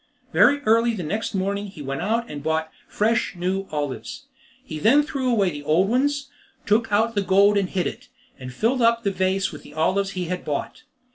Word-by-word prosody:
Very 285 +3 +5
early 230 -1 +3
next 200 +6 -3
morning 200 +2 -1
he 160 -7 -10
went 135 0 -4
out 230 +4 0
and 145 -1 -7
bought 160 +1 -1 0.2
fresh 220 -1 0
new 190 +2 -2
olives; 145 -3 -5 0.4
he 155 - -6
then 255 - +5
threw 275 -4 -2
away 200 -6 +2
the 145 -1 -7
old 165 +7 +2
ones, 280 +3 0 0.3
took 225 +1 +1
out 220 +3 +2
the 205 - +1
gold 200 +2 +4
and 195 -2 +1
hid 185 -2 -1
it, - - -6 0.3
and 130 -1 -7
filled 235 - 0
up 230 0 +3
the 200 - +1
vase 190 0 0
with 150 - -10
the 150 - -15
olives 195 +5 0
he 180 - -1
had 180 +1 -4
bought. 150 - -4
195 Hz, 200 wpm, -23 LUFS, 170-230 Hz, 0.4 s, Very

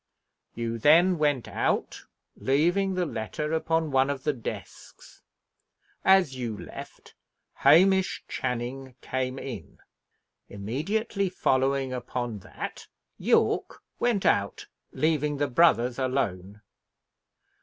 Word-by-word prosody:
You 115 0 -3
then 170 +7 +5
went 145 -5 +1
out, - - -2 0.3
leaving 175 +8 +1
the 180 -1 0
letter 150 +4 -4
upon 160 -1 0
one 135 +1 +3
of 140 -2 -3
the 150 - +1
desks. 120 -4 -9 0.8
As 190 -8 +4
you 120 -4 -4
left, - - -10 0.4
Hamish 190 +4 +4
Channing 125 +1 -4
came 130 0 -3
in. 120 - -8 0.7
Immediately 185 - -2
following 135 -5 +1
upon 120 -3 -4
that, - - -8 0.3
Yorke - - +1 0.2
went 235 -5 +1
out, 100 0 +1 0.3
leaving 150 -2 0
the 145 - +1
brothers 125 -4 +3
alone. 105 -7 -2
135 Hz, 100 wpm, -27 LUFS, 120-165 Hz, 0.8 s, then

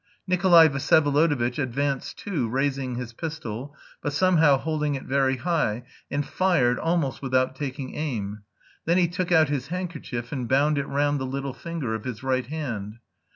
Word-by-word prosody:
Nikolay 175 -3 +6
Vsyevolodovitch 145 -2 +2
advanced 135 +1 -2
too, 155 - -2
raising 135 0 -1
his 120 -1 -5
pistol, 145 -3 -6 0.3
but 145 - -2
somehow 160 -4 +4
holding 150 0 -1
it 135 - -5
very 135 -1 +1
high, 125 -6 0 0.3
and 145 0 -1
fired, 145 -10 +2
almost 165 -5 0
without 130 -1 +1
taking 135 -1 -5
aim. 110 -9 -3 0.4
Then 170 +2 +3
he 180 -2 +4
took 180 +1 -3
out 160 -4 +5
his 140 -2 -2
handkerchief 160 -9 -5
and 125 -5 -3
bound 145 +2 +3
it 140 - -3
round 145 +1 +1
the 130 - -3
little 135 0 -3
finger 165 -9 -4
of 110 +1 -5
his 125 -2 -5
right 130 -2 0
hand. 120 -9 -4
140 Hz, 160 wpm, -25 LUFS, 130-160 Hz, 0.4 s, Nikolay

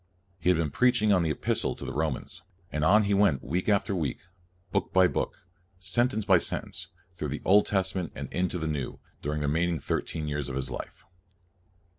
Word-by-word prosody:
He 85 - +1
had 90 - +4
been 80 -3 0
preaching 110 - +3
on 90 - +4
the 80 - 0
Epistle 75 - 0
to - - -8
the - - -4
Romans, 75 -2 -3 0.3
and 75 - -1
on 105 +6 +6
he 100 0 +1
went 100 -9 +3
week 90 +5 -1
after 100 0 +2
week, 80 -6 -2 0.5
book - - 0
by 95 -1 +6
book, 90 - -3 0.3
and 90 - -26
sen 120 +1 +3
tence 110 -5 -3
by 95 -4 +6
sentence, - - -2 0.3
through 75 -3 -4
the 75 - -4
New 100 +2 +7
Testa 95 -2 0
ment 90 - -4
and - - -5
into 90 0 0
the 80 - -3 0.2
Old, - - -7 0.2
during 75 +1 -2
the 75 - 0
remain 85 +4 +2
ing 85 -3 -1
thirteen 75 +3 -2
years 75 -1 -2
of 65 - -4
his 65 - -2
life. - - -7
90 Hz, 215 wpm, -28 LUFS, 75-100 Hz, 0.5 s, New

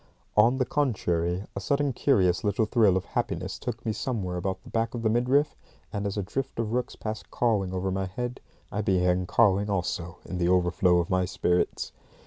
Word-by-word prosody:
On 115 +5 +5
the 130 - +1
contrary, 90 - 0
a - - -2
sudden 140 +5 0
curious 95 -10 +2
little 105 +1 +1
thrill 105 -4 +4
of 95 - -3
happiness - - -3
took 120 -2 -5
me 110 - 0
somewhere 105 -5 -2
about 95 +1 -3
the - - -12
back 115 +1 0
of 115 - -4
the 110 - +3
midriff, 130 +6 +2 0.4
and, 100 0 -1
as 100 - -4
a 100 - 0
drift 135 +7 -4
of 115 -1 -2
rooks 125 0 -1
passed 110 0 -6
cawing 105 -6 +1
over 95 +1 -1
my 95 0 -1
head, 120 +6 -4 0.3
I 105 - -1
began 90 -2 +2
cawing 100 -1 +3
also 85 -3 -2
in 90 - -5
the 85 0 +2
overflow 90 0 +3
of 85 +3 0
my 95 0 +2
spirits. 90 -1 0
100 Hz, 195 wpm, -27 LUFS, 90-115 Hz, 0.4 s, On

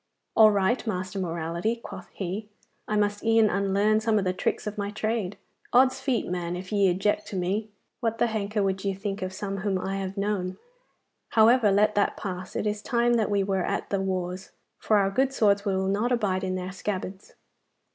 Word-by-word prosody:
'All 220 -1 +8
right, 205 +4 +1
Master 185 -1 -3
Morality,' 170 +4 -2
quoth 195 -6 -10
he, 200 +3 -5 0.4
'I 210 - -1
must 205 0 0
e'en 225 -1 +4
unlearn 200 +2 +2
some 220 -1 +1
of 200 - 0
the 185 - +1
tricks 185 - -2
of 210 0 -4
my 205 -2 -3
trade. 210 -2 -2 0.4
Od's 260 +1 +5
feet, 260 -3 0
man, 175 -1 -3
if 185 +2 -7
ye 200 -2 +4
object 195 +4 0
to - - -6
me, 195 +4 -1 0.3
what 230 -1 -1
the - - +3
henker 210 -2 -1
would 190 -1 -1
ye 195 -1 -1
think 195 0 -4
of 185 0 -3
some 195 +1 -4
whom 195 -1 -1
I 195 +1 -3
have 195 0 -4
known? 195 -2 -1 0.8
However, 225 -1 +5
let 210 +2 +3
that 205 - +1
pass. 185 -2 -6
It - - -1
is 210 0 -1
time 240 +1 +2
that 225 -3 +2
we 200 -1 +2
were 190 -1 0
at - - -3
the 200 -1 +1
wars, 185 0 -3 0.3
for 215 - +2
our 195 -1 +2
good 265 +5 +2
swords 205 -4 +3
will 190 -1 0
not 235 +5 +1
bide 190 -3 0
in 185 0 -1
their 185 0 -4
scabbards. 190 0 -5
200 Hz, 200 wpm, -26 LUFS, 190-215 Hz, 0.8 s, All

